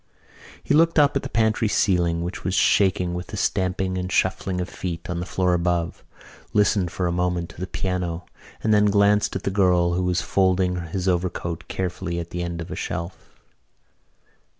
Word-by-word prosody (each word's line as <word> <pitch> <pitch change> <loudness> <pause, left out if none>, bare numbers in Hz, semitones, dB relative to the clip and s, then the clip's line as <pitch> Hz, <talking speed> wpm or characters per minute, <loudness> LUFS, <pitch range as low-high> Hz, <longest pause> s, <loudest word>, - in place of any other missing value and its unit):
He - - 0
looked 165 +2 +4
up 145 -1 +5
at 140 - +1
the - - -6
pantry 110 0 +2
ceiling, 85 -5 +1
which 90 +2 -5
was 90 - -1
shaking 95 -4 +3
with 90 0 -5
the 105 - -7
stamping 95 0 0
and 90 +1 -4
shuffling 95 -1 0
of 90 - -2
feet 85 -1 -5
on 85 - -2
the 90 - -4
floor 90 -1 +1
above, 85 -1 -1 0.5
listened 100 -3 +2
for 90 - -2
a 85 - +1
moment 90 -1 -1
to - - -14
the 95 - -3
piano 90 -2 -3 0.4
and 110 - +3
then 105 0 +5
glanced 100 0 +3
at - - -3
the 100 - -1
girl, 90 -3 +3
who 90 - 0
was 90 -1 +1
folding 90 -2 +1
his 90 +3 -3
overcoat 85 -2 -2
carefully 90 -1 -3
at 85 -1 -5
the 90 - -3
end 85 -1 -4
of 85 - -8
a - - -3
shelf. 85 +2 -6
90 Hz, 190 wpm, -23 LUFS, 85-95 Hz, 0.5 s, up